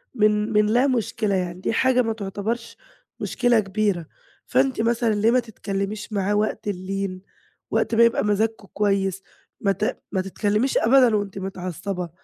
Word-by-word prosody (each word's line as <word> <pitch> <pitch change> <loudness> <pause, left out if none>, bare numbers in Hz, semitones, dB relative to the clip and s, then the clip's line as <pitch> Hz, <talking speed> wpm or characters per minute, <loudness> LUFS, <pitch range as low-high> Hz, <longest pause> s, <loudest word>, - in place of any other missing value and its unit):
من 210 0 +2
من 210 0 +4
لا 240 +6 +3
مشكلة، 220 -4 0
يعني 180 -1 -3
دي - - -1
حاجة 255 +2 +3
ما 225 -2 -1
تُعتبرش 220 +3 -4 0.4
مشكلة 245 -2 +2
كبيرة. 195 -3 -1 0.4
فأنتِ 260 -2 +1
مثلًا 230 0 +1
ليه 215 +3 +3
ما 255 - +4
تتكلِّميش 210 -2 -4
معاه 200 0 0
وقت 210 0 -1
اللين، 195 -1 -3 0.5
وقت 230 - +1
ما 230 - +6
يبقى 235 0 +3
مزاجكم 215 0 0
كويس؟ 195 -2 0 0.4
ما 200 - +2
ت 210 +6 -2
ما 190 - 0
تتكلِّميش 210 +6 0
أبدًا 245 -1 +5
وأنتِ 200 -2 -2
متعصّبة. 185 -1 -4
210 Hz, 150 wpm, -23 LUFS, 195-230 Hz, 0.5 s, ما